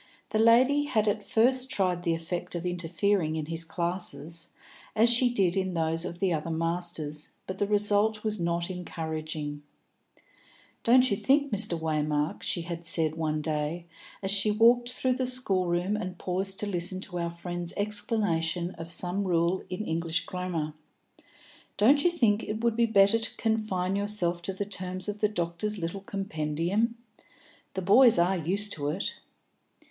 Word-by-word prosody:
The 215 - 0
lady 255 +6 +5
had 220 -6 +1
at 210 +1 +1
first 255 +4 +2
tried 185 -8 +1
the 170 -2 +1
effect 170 +2 -4
of 170 +1 -4
interfering 175 0 0
in 155 -1 -2
his 165 +1 -2
classes, 170 -2 -3 0.4
as 230 +2 +5
she 245 +1 +4
did 195 -6 +2
in 190 -2 -1
those 165 +1 0
of 170 - -5
the 185 -1 +1
other 155 +1 -2
masters, 165 -2 -3 0.2
but 190 0 -6
the 205 - +1
result 210 +1 +2
was 215 -1 -2
not 170 +1 -1
encouraging. 155 -4 -5 1.2
"Don't 255 +1 +5
you - - +3
think, 280 +5 +2
Mr. 190 -5 +2
Waymark," 150 -1 -1
she 170 - 0
had 170 0 -6
said 160 -1 +2
one 155 -1 -2
day, 155 +2 -2 0.4
as 195 - 0
she 205 +1 +3
walked 240 +3 +4
through 255 0 0
the 255 0 -1
school 200 -8 -1
room 175 +4 0
and 185 -4 -4
paused 190 +2 -3
to - - -1
listen 185 -1 0
to 180 -3 -5
our 170 0 -1
friend's 175 0 -5
explanation 205 -5 -1
of 165 0 -6
some 180 +3 +1
rule 175 +1 +1
in 185 +4 -4
English 165 -1 -1
grammar; 175 -4 -3 1.0
"don't 275 +8 +5
you 350 - +5
think 230 -11 +2
it 215 +2 -4
would 235 -2 +2
be 235 0 +3
better 205 0 +5
to 225 - -5
confine 215 -5 0
yourself 200 -4 0
to 175 - -3
the 195 +2 -4
terms 185 -1 -4
of 210 0 -4
the 210 - +2
doctor's 190 +2 -2
little 175 +2 -4
compendium? 195 +4 -1 0.8
The 190 - -2
boys 230 +4 +6
are 175 +3 +3
used 200 +5 0
to 145 -1 -3
it." 180 +7 -2
185 Hz, 165 wpm, -28 LUFS, 170-210 Hz, 1.2 s, boys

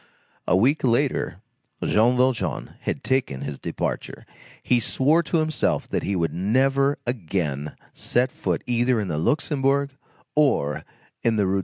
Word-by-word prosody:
A 90 - +4
week 135 +10 +2
later, 120 -2 +1 0.4
Jean 120 +4 +3
Valjean 125 - 0
had - - -3
taken 130 - 0
his 70 - -5
departure. - - -4 0.4
He 125 - +3
swore 145 +8 +2
to 165 +1 -1
himself 155 -3 0
that - - -1
he 100 - -1
would 85 -2 0
never 135 +9 +2
again 80 - -2 0.2
set 125 +1 0
foot - - -2
either 120 0 +2
in 100 -3 -2
the 75 -2 -1
Luxembourg 140 - +1 0.4
or 135 - +2 0.4
in 115 -1 +2
the 105 -2 +2
Rue 95 - 0
de - - +1
l'Ouest. 100 - +2
120 Hz, 155 wpm, -24 LUFS, 95-135 Hz, 0.4 s, A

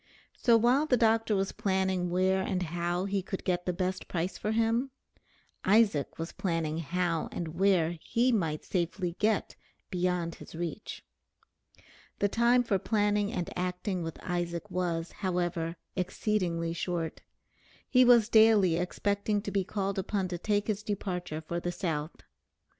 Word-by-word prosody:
So 235 -2 +4
while 250 +7 +3
the 250 - +3
doctor 225 -1 +3
was 195 0 0
planning 190 -2 0
where 185 +2 +2
and 190 -1 -1
how 175 +2 -1
he 200 0 0
could 190 +1 -5
get 180 -1 -1
the - - +3
best 185 +1 -2
price 175 +1 -2
for 215 - -2
him, 230 +4 +1 0.7
Isaac 200 -8 +3
was 165 +1 -4
planning 165 -3 -2
how 170 0 -1
and 170 -2 -4
where 170 -1 +2
he 245 +2 +2
might 165 -9 -1
safely 175 0 -2
get 215 0 +1 0.4
beyond 180 -2 0
his - - -12
reach. 170 +4 -5 1.1
The 205 - +2
time 235 +4 +3
for 200 -5 +1
planning 205 0 +1
and 180 -8 -3
acting 180 +1 -2
with 165 -1 -5
Isaac 175 +2 -3
was, 175 -2 -1
however, 175 -3 -2 0.2
exceedingly 180 -3 -1
short. 170 -1 -3 0.7
He 255 -1 +5
was 240 -3 +6
daily 220 -6 +5
expecting 200 +3 0
to 200 - -4
be 195 -1 +1
called 195 0 -2
upon 190 -1 -1
to 175 -1 -4
take 205 +2 0
his 210 -2 -1
departure 180 -6 -3
for 170 - -2
the 175 0 -2
South. 160 -3 -3
185 Hz, 150 wpm, -30 LUFS, 175-210 Hz, 1.1 s, was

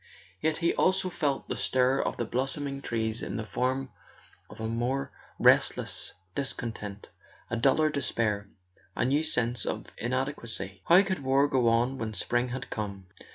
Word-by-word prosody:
Yet 155 -1 +1
he 170 0 +1
also 190 0 +2
felt 145 -5 -1
the - - -2
stir 130 +1 +2
of - - -2
the 120 - -1
blossoming 135 +3 -2
trees 110 -2 -1
in - - -4
the 110 - -3
form 130 +5 -1 0.6
of - - -12
a 110 - -3
more 120 +4 -1 0.3
restless - - +3 0.2
dis¬ 140 -1 +1
content, 105 -4 -6 0.4
a - - +1
duller 140 +6 +3
despair, 110 -7 0 0.5
a - - +1
new 140 +4 +2
sense 125 -6 +2
of - - -4
inadequacy. 120 -6 -2
How 180 +4 +7
could 190 -1 -2
war 135 +1 +3
go 130 -4 +2
on 120 +3 +2
when 110 -1 -4
spring 120 +3 0
had 130 +1 -6
come? 100 -3 -4
125 Hz, 160 wpm, -29 LUFS, 115-140 Hz, 0.6 s, How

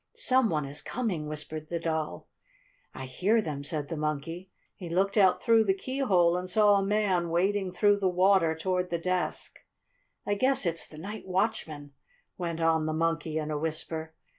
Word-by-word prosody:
"Some 260 - +3
one 150 -4 -1
is 140 +2 -4
coming!" 195 -11 -3
whispered 155 +1 -5
the 170 - -2
Doll. 160 - -3 0.6
"I 130 - -7
hear 190 - +1
them," 150 -9 -4
said 145 0 -2
the 165 - -4
Monkey. 155 +4 -4 0.3
He 180 -3 -8
looked 190 +4 +1
out 190 -4 +4
through 230 -2 +5
the 190 -3 +1
keyhole 195 -8 +1
and 180 0 -3
saw 210 +2 +5
a 195 - +1
man 195 -4 +1
wading 190 +2 0
through 205 +2 +3
the 190 -2 +2
water 180 -2 +3
toward 180 +2 -1
the 170 - -1
desk. 180 +1 -2 0.7
"I 205 - 0
guess 260 +2 +2
it's 165 -1 -1
the 155 - -13
night 205 +6 -7
watchman," 180 -7 -2 0.4
went 170 -2 -4
on 160 -1 +2
the 155 - -1
Monkey 165 -1 -1
in 155 -1 -3
a 150 - -2
whisper. 160 0 -4
175 Hz, 180 wpm, -28 LUFS, 155-200 Hz, 0.7 s, through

